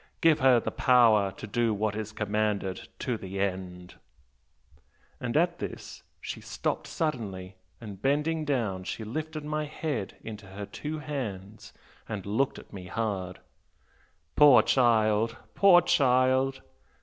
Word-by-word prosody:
Give 165 -2 +4
her 130 -2 +5
the - - -4
power 115 -6 +4
to 95 - -8
do 115 +1 0
what 105 0 -1
is 110 0 -4
commanded, 105 -2 -2
to 120 -3 -2
the 95 -1 -6
end.' 90 -2 -3 1.3
And 120 +3 -1
at 170 +1 +1
this - - -7 0.2
she - - -6
stopped - - -3
suddenly 100 - -3 0.2
and 100 -4 -9
bending 150 +4 +1
down 115 -11 -1
she 110 - -5
lifted 155 +6 -5
my 155 0 -2
head 145 -8 -4
in 110 -2 -7
her 100 0 -8
two 150 +8 -6
hands 110 -9 -6 0.4
and 100 -3 -5
looked 110 +7 0
at - - -13
me 90 -2 -8
hard 95 -3 -3 0.9
'Poor 145 -4 +7
child, 115 -3 +2 0.2
poor 190 -3 +6
child! 130 -3 +2
115 Hz, 135 wpm, -28 LUFS, 100-140 Hz, 1.3 s, Poor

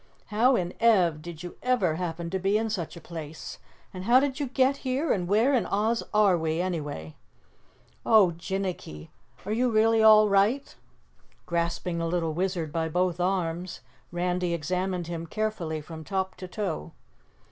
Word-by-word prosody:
"How 245 +5 +4
in 180 -3 -1
Ev 185 -10 +3
did 170 0 -9
you 175 - -8
ever 240 -10 +2
happen 170 0 -4
to 190 - -1
be 195 +3 +2
in 220 0 -1
such 175 -4 -4
a - - -8
place, 160 -2 -8 0.3
how 210 +7 +4
did 275 0 -1
you 285 - -1
get 265 +2 +2
here 270 +4 -1
and 180 -3 -2
where 220 +8 +3
in 250 - +2
Oz 220 +3 +1
are 210 -3 +4
we, 160 0 -1
anyway?" 150 - -4 0.9
"Oh, 210 -6 +5
Jinnicky, 175 - -5 0.4
are 205 - -3
you 245 +3 +2
really 225 0 +3
all 215 -1 +7
right?" 205 +8 +2 0.7
Grasping 170 0 -2
the 165 - -1
little 165 -2 -1
Wizard 175 -2 -2
by 160 0 -1
both 180 +1 0
arms, 180 -1 -2 0.3
Randy 175 0 -1
examined 180 +3 -2
him 165 0 -5
carefully 180 -7 -3
from 160 +1 -9
top 190 +2 -2
to 185 - -7
toe. 180 - -4
185 Hz, 160 wpm, -27 LUFS, 170-215 Hz, 0.9 s, all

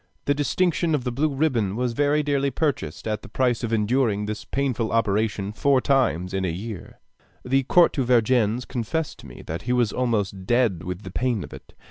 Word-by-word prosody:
The 145 - +3
distinction 165 +3 +1
of 135 - -2
the 125 - -2
blue 145 +6 +1
ribbon 130 -9 0
was 125 0 -1
very 145 +3 +2
dearly 140 -1 +1
purchased 130 - -2
at 105 -1 -2
the - - -12
price 125 -2 0
of 115 - -2
enduring 110 -1 +1
this 105 0 -5
painful 130 -5 -1
operation 105 -2 0
four 140 +4 +3
times 100 - +1
in 95 0 -1
a 90 - 0
year, 95 +3 -7 0.5
The 135 +1 +1
Count 175 -1 +6
de 135 - -1
Vergennes 120 -1 +2
confessed 140 +6 -3
to - - -12
me - - -11
that 80 +2 -5
he 125 - -1
was 120 -4 +1
almost 100 -6 -1
dead 120 -8 +2
with 90 +3 -5
the 95 - -8
pain 120 -2 -1
of - - -10
it. - - -13
120 Hz, 200 wpm, -24 LUFS, 105-135 Hz, 0.5 s, Count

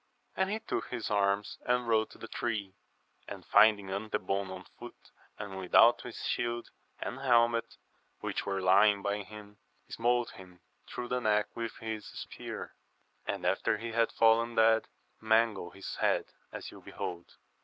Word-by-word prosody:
And 190 0 +1
he 210 - -1
took 220 - -3
his 120 -4 -4
arms 100 0 +1
and 125 0 +1
rode 110 -1 +2
to - - -15
the 115 - -8
tree, 110 -5 -3 0.5
and - - -8
finding 105 -2 +5
Antebon 100 -1 -2
on 95 0 -8
foot - - -12 0.3
and 95 -2 -6
without 90 -1 +5
his - - -8
shield 120 0 -2 0.3
and 130 - -5
helmet, 120 -3 +2 0.4
which - - -3
were 95 -1 -2
lying 100 +2 +5
by 100 +1 0
him, 105 +1 -12 0.3
smote 120 +1 +1
him 90 -1 -14 0.3
through 120 0 -6
the 125 0 0
neck 105 -2 +2
with 115 -1 -4
his 110 -1 -5
spear; - - -7 0.5
and - - -3
after - - +1
he 115 0 -5
had 115 0 +2
fallen 115 +1 +3
dead, 110 0 +4 0.3
mangled 110 -4 +1
his 100 - -7
head - - +2 0.3
as - - -7
you - - -13
behold. 85 -1 -7
110 Hz, 155 wpm, -31 LUFS, 100-115 Hz, 0.5 s, finding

